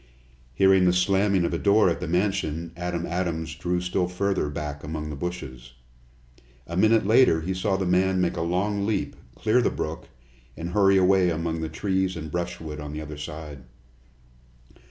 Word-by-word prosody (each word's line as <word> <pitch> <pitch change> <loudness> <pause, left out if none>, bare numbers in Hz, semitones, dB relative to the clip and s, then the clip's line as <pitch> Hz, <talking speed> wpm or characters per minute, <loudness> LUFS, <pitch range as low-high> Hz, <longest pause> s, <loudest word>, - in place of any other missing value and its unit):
Hearing 95 +1 +5
the 90 - +4
slamming 95 0 +2
of 85 - -2
a 85 - -1
door 105 +1 +4
at 85 - 0
the 90 - -4
mansion, 85 -3 -1
Adam 85 0 -3
Adams 85 -2 -2
drew 90 +2 -2
still 90 0 -1
further 95 -3 -1
back 75 0 -5
among 75 0 -5
the - - -5
bushes. 70 -7 -6 0.9
A 85 - -6
minute 110 +3 +4
later 110 -6 +5
he 90 +4 -2
saw 95 +1 0
the 95 - -1
man 95 +1 +2
make 90 -1 0
a - - -2
long 100 +4 0
leap, 105 -3 -1 0.2
clear 110 +3 +2
the - - +2
brook, - - -5 0.5
and 85 +1 -5
hurry 95 0 +4
away 95 -1 +4
among 80 0 -2
the 80 - -3
trees 95 +2 -1
and 80 -2 -7
brushwood 85 -3 -4
on 75 0 -7
the 75 - -5
other 75 -1 -8
side. 75 -2 -7
90 Hz, 175 wpm, -25 LUFS, 80-95 Hz, 0.9 s, Hearing